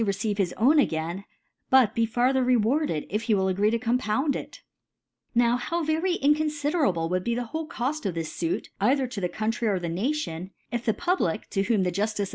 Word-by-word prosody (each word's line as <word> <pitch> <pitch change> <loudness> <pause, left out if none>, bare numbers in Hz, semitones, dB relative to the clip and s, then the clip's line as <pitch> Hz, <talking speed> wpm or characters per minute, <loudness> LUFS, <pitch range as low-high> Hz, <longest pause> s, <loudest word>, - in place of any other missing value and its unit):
receive 200 0 -1
his 180 -3 +1
own 285 +7 +5
again, 170 - -1 0.5
but 255 -5 +5
be 230 -1 +2
farther 255 +3 +2
rewarded, 245 - +1
if 210 +3 -1
he 225 -2 +2
wil( 190 -1 +1
agree 195 +3 +2
to 230 - +1
compound 245 +4 0
it? - - -8 0.7
Now 240 0 +4
how 335 +7 -2
very 325 +4 +1
inconfiderable 295 - +1
would 180 +1 -1
be 235 +3 0
the 245 - -1
whole 315 +7 -4
Coft 290 -4 -2
of 180 - -3
this 165 -1 -4
Suit 165 -1 -2
either 265 +6 +3
to 240 -5 -6
the 180 - 0
County 225 +3 -2
or 200 -3 +2
the 175 -2 -3
Nation; 190 - -2 0.2
If 240 0 -3
the 220 - +2
Ehiblic, 350 - -1
to 195 - +1
whom 205 -1 +1
the 180 - 0
Juftice 210 +4 -1
of. 200 - -2
230 Hz, 205 wpm, -26 LUFS, 195-270 Hz, 0.7 s, own